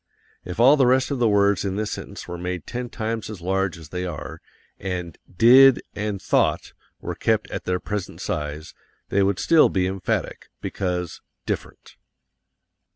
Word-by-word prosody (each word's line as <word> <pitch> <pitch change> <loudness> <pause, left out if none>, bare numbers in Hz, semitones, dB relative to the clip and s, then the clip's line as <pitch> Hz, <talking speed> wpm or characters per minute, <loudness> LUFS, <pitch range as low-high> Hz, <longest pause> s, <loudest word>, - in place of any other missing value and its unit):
If 90 +3 -7
all 135 +5 +7
the 135 -3 +4
rest 130 +2 +3
of 140 - -1
the 120 - +3
words 100 -2 +3
in 95 -1 -2
this 105 0 -2
sentence - - -7
were 85 - -6
made 90 -1 -4
ten 125 0 -5
times 110 -1 -4
as 105 -4 -7
large 95 0 -1
as 80 -3 -12
they 90 +2 -4
are, 85 -5 -6 0.4
and 90 -4 -4 0.2
DID 125 +7 +7
and 105 -1 -3
THOUGHT - - +1 0.3
were - - -4
kept - - 0
at - - -5
their 90 0 0
present 105 -1 -5
size, 75 +1 -4 0.4
they 100 - +2
would 100 -1 +2
still 165 +7 +5
be 95 -1 0
emphatic, 95 -1 -3
because 90 -3 -3 0.2
different. - - -6
95 Hz, 165 wpm, -23 LUFS, 90-115 Hz, 0.4 s, all